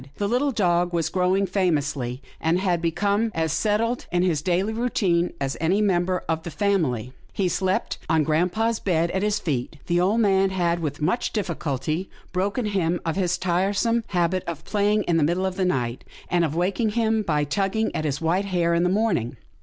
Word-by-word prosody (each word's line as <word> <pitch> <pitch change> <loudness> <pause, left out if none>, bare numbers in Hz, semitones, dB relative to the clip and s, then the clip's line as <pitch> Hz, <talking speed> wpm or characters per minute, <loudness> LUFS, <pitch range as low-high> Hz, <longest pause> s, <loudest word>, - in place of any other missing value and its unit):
The 205 - -1
little 255 +6 +1
dog 175 -5 +1
was 165 -2 0
growing 185 +2 +2
famously, 150 -9 -1 0.2
and 165 +3 +1
had 180 -3 0
become 200 +6 +1
as 160 -1 0
settled 225 +5 0
in 175 0 +2
his 165 -5 +1
daily 185 +6 0
routine 195 -7 +1
as 135 -1 -2
any 180 +5 +2
mem 185 -4 +2
ber 185 0 -1
of 160 0 -1
the 170 - -6
family. 155 - 0 0.2
He 195 - 0
slept 185 +2 -1
on 160 -1 +3
grampa' 175 +8 +1
s 230 - -2
bed 170 -2 +1
at 190 - -1
his 210 0 +1
feet. 145 -3 -3
The 175 0 +1
old 200 +6 +2
man 195 -3 +3
had, 175 -2 0
with 150 -2 -4
much 180 +10 0
difficulty, 165 - -2 0.2
broken 200 +6 -1
him 175 -4 0
of 165 - -1
his 180 -2 0
tiresome 195 +6 +1
habit 180 0 0
of 170 -3 -5
playing 210 0 +1
in 170 -2 +1
the 160 - +3
middle 175 +5 +1
of 190 -1 -2
the 190 -1 0
night, 125 -8 -1 0.3
and 175 -1 +3
of 155 -2 -1
waking 200 +5 0
him 225 -1 +1
by 150 -7 0
tugging 195 +9 -1
at 155 - -1
his 145 -3 -1
white 175 +5 +1
hair 175 -3 +1
in 170 - +2
the 180 - +2
morning. 190 - 0
180 Hz, 200 wpm, -24 LUFS, 165-200 Hz, 0.3 s, on